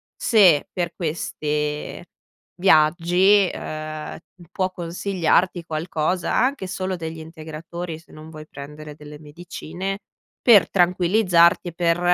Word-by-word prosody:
se, 185 - +4
per 175 -2 -3
queste 150 -2 -3 0.5
viaggi, 180 +3 +4
ehm, 155 0 -6 0.2
m 175 - -15
può 185 -1 -1
consigliarti 175 0 0
qualcosa; 160 +2 -2
anche 260 -5 +1
solo 185 0 -3
degli 160 -2 -6
integratori, 160 +1 -8
se 170 - -20
non 155 +1 -11
vuoi 155 -1 -11
prendere 150 +1 -10
delle 150 0 -12
medicine, 175 +5 -6 0.5
per 220 -5 +7
tranquillizzarti 180 -1 +3
e 170 - -12
per, 170 0 +1
170 Hz, 115 wpm, -22 LUFS, 155-185 Hz, 0.5 s, per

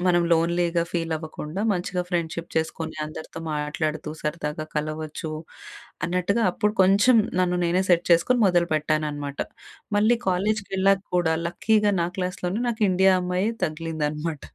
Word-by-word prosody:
మనం 175 -1 +4
లోన్లీగా 170 +1 +2
ఫీల్ 165 -2 -1
అవ్వకుండా 155 +3 -6
మంచిగా 180 0 -2
ఫ్రెండ్షిప్ 170 -1 -2
చేసుకొని, 160 0 -2
అందరితో 160 +1 -8
మాట్లాడుతూ, 150 +1 -2
సరదాగా 150 0 -3
కలవచ్చు 155 +1 -3 0.7
అన్నట్టుగా 180 +6 0
అప్పుడు 210 +3 0
కొంచెం 200 +6 +5 0.2
నన్ను 180 -1 +1
నేనే 175 +2 +2
సెట్ 175 0 +4
చేసుకొని, 170 +10 +4
మొదలుపెట్టాననమాట. 155 -4 0 0.6
మళ్ళీ 220 +3 +4
కాలేజ్‌కెళ్ళాక 195 0 +1
కూడా 160 -2 +2
లక్కీగా 210 +4 +2
నా 170 - +2
క్లాస్‌లోనే, 185 +2 -2
నాకు 230 -1 -2
ఇండియా 190 +1 +5
అమ్మాయే 180 +4 0
తగిలిందనమాట. 155 -1 -3
170 Hz, 120 wpm, -24 LUFS, 155-185 Hz, 0.7 s, కొంచెం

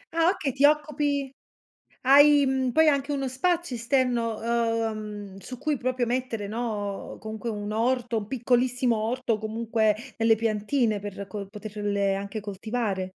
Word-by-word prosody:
Ah 330 +1 +4
okay, 305 -9 -1
ti 275 - -1
occupi 295 -2 +2 0.7
hai 285 +2 +7
mhmm 260 -1 +1
poi 320 +5 +5
hai 295 - +6
anche 280 +1 -2
uno 275 -2 -1
spazio 335 +2 0
esterno 235 -2 +1
uhm 220 -4 -2
su 255 +5 -8
cui 300 +3 -1
proprio 255 0 -1
mettere, 235 -4 -2
no, 210 -3 -4
comunque 220 +2 -5
un 205 -1 -4
orto, 240 +1 0
un 205 -1 -4
piccolissimo 250 0 +1
orto, 230 +1 -1
comunque 220 0 0 0.2
delle 225 0 +4
piantine 220 +1 0
per 200 0 -6
co 200 0 -6
poterle 205 -1 -2
anche 200 +2 -5
coltivare? 205 0 -2
230 Hz, 145 wpm, -26 LUFS, 210-260 Hz, 0.7 s, hai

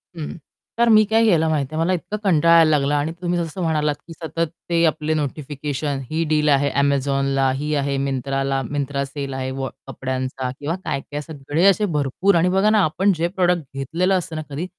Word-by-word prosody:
हं. 155 -1 -6 0.4
तर 235 0 +4
मी 215 -1 +7
काय 225 +1 +4
केलं 165 -7 +3
माहितीये? 155 -1 -1
मला 170 +3 +2
इतका 180 +4 -3
कंटाळा 170 -3 +4
यायला 165 -1 +6
लागला 145 +1 +1
आणि 145 +2 -1
तुम्ही 175 0 0
जसं 165 +2 -4
म्हणालात, 150 -3 +1
की 165 - -9
सतत 165 0 -3 0.2
ते 170 -1 +2
आपले 155 0 0
नोटिफिकेशन 145 -1 -3
ही 160 +1 0
डील 150 -1 +2
आहे 140 0 +3
Amazonला, 135 -1 +1
ही 150 +2 -2
आहे 140 -1 0
Myntraला, 135 0 -1
Myntra 140 -1 -1
सेल 140 0 -6
आहे 130 0 -3
वॉ 135 -1 -2 0.2
कपड्यांचा 130 -1 -3
किंवा 150 +4 -2
काय-काय 145 +2 -3
सगळे 150 +2 -2
असे 210 +2 +2
भरपूर 150 +8 +1
आणि 170 +2 +3
बघा 195 +3 +3
ना 215 -2 +4
आपण 190 +5 +2
जे 165 +2 +1
प्रॉडक्ट 180 -2 +1
घेतलेलं 165 +8 0
असतं 165 -3 -5
ना 155 - -3
कधी, 145 +5 -4
150 Hz, 190 wpm, -21 LUFS, 140-170 Hz, 0.4 s, मी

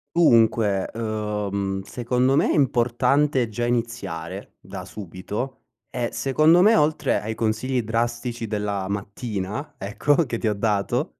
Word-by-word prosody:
Dunque, 115 - +4
ehm, 105 -3 -2
secondo 125 +5 0
me - - +3
è - - +2
importante 130 0 +2
già 120 +2 -2
iniziare 115 -9 -3
da - - -8
subito, 105 +7 -6 0.3
ehm, 120 -1 -2
secondo 155 +6 +4
me 215 +4 +6
oltre 150 -2 +2
ai 110 +1 -4
consigli 115 +3 0
drastici 120 +1 -2
della 105 -2 -2
mattina, 100 +5 -4
ecco 105 +9 +1
che 120 -3 -3
ti 110 - -2
ho 105 - +2
dato 110 +6 0
115 Hz, 130 wpm, -23 LUFS, 105-130 Hz, 0.3 s, me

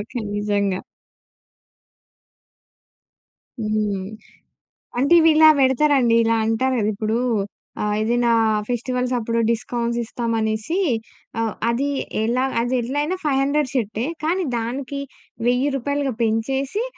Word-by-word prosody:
Okay. 225 +4 -5
నిజంగా. 200 -2 0 2.8
హ్మ్. 210 -3 -1 0.9
అంటే 280 +5 +3
ఇవిలా 315 -1 +7
బెడతారండి. 265 -3 +3
ఇలా 230 0 +2
అంటారు 255 +4 +1
గదిప్పుడూ 215 +2 -1 0.6
ఆహ్, 210 0 0
ఏదైనా 235 +1 +2 0.4
ఫెస్టివల్స్ 250 +1 -2
అప్పుడు 230 0 -1
డిస్కౌంట్స్ 235 +1 -1
ఇస్తాం 235 0 -3
అనేసి 220 - -1 0.6
ఆహ్, 225 -1 0 0.2
అది 270 +5 0 0.3
ఎలా 245 +3 +1 0.2
అది 245 +2 -1
ఎట్లయిన 290 +8 -1
500 280 -1 +1
షర్టే 225 -2 -1 0.2
కానీ, 355 +4 +1
దానికి 260 +4 -4 0.5
1000 250 +3 +2
రూపాయలుగా 285 +1 -1
పెంచేసి 265 - -1
240 Hz, 100 wpm, -22 LUFS, 220-275 Hz, 2.8 s, ఇవిలా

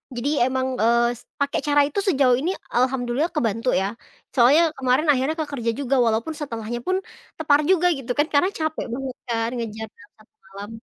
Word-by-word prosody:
Jadi 240 +4 -2 0.2
emang, 260 0 -1
eee, 235 +1 +4
s - - -17 0.2
pakai 280 0 0
cara 290 0 +4
itu 295 +7 -3
sejauh 270 -7 +4
ini, 335 +6 -1
eee, - - -4
Alhamdulillah 255 +3 0
kebantu 230 -2 0
ya. 190 - +1 0.5
Soalnya 265 +5 +5 0.2
kemarin 265 +4 +1
akhirnya 275 +4 0
ke - - -1
kerja 235 -5 -1
juga 275 -1 0
walaupun 225 +7 0
setelahnya 235 -4 -4
pun 370 - +2 0.4
tepar 295 -3 +3
juga 360 -1 +4
gitu 245 -2 -5
kan, 295 +2 +3
karena 285 +6 +4
capek 315 0 -2
banget 260 0 -4
kan 230 -1 -1
ngejar 220 -1 -5
dalam 205 - -19
1 215 - -23
malam. 200 +2 -9
260 Hz, 190 wpm, -23 LUFS, 230-290 Hz, 0.5 s, Soalnya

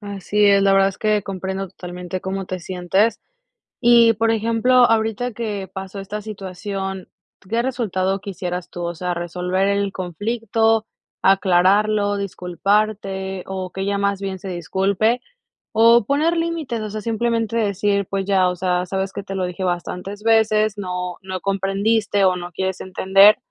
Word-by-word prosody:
Así 205 0 -1
es, 200 -1 +5
la 195 - +4
verdad 195 0 +5
es 195 - -8
que 215 -1 +1
comprendo 190 0 -4
totalmente 180 0 -7
cómo 190 +1 -3
te 185 0 -5
sientes. 190 +5 0 0.6
Y, 235 -1 +6
por 225 +2 +1
ejemplo, 225 +3 +1
ahorita 225 +2 0
que 210 -4 -4
pasó 190 +1 -7
esta 210 +2 -6
situación, 195 -2 -5 0.4
¿qué 230 +3 +1
resultado 195 -7 -1
quisieras 180 -3 -5
tú? 175 - -6
O 170 0 -3
sea, 180 +1 -3
resolver 180 +3 -1
el 200 0 0
conflicto, 225 +4 0 0.4
aclararlo, 200 +2 +3
disculparte, 195 0 -1
o 190 -1 -5
que 190 - -5
ella 200 +1 0
más 200 -1 0
bien 195 -1 -4
se 190 - -8
disculpe, 195 +6 0 0.5
o 230 0 +5
poner 305 +7 +1
límites, 325 -9 -2
o 215 - -4
sea, 215 +1 -5
simplemente 230 +1 -1
decir, 200 -2 0
pues 195 -1 -2
ya, 190 -2 +3
o 180 - -3
sea: 180 0 0
"¿Sabes 190 +1 -3
qué?, 200 - -5
te 195 0 -6
lo 185 -1 -1
dije 180 +1 -5
bastantes 180 +3 -4
veces, 215 -2 +3
no 180 -2 -4
no 190 -1 -5
comprendiste 200 +2 +1
o 185 -1 +3
no 175 0 -6
quieres 190 +1 -3
entender", 195 +2 +5
195 Hz, 160 wpm, -21 LUFS, 185-215 Hz, 0.6 s, Y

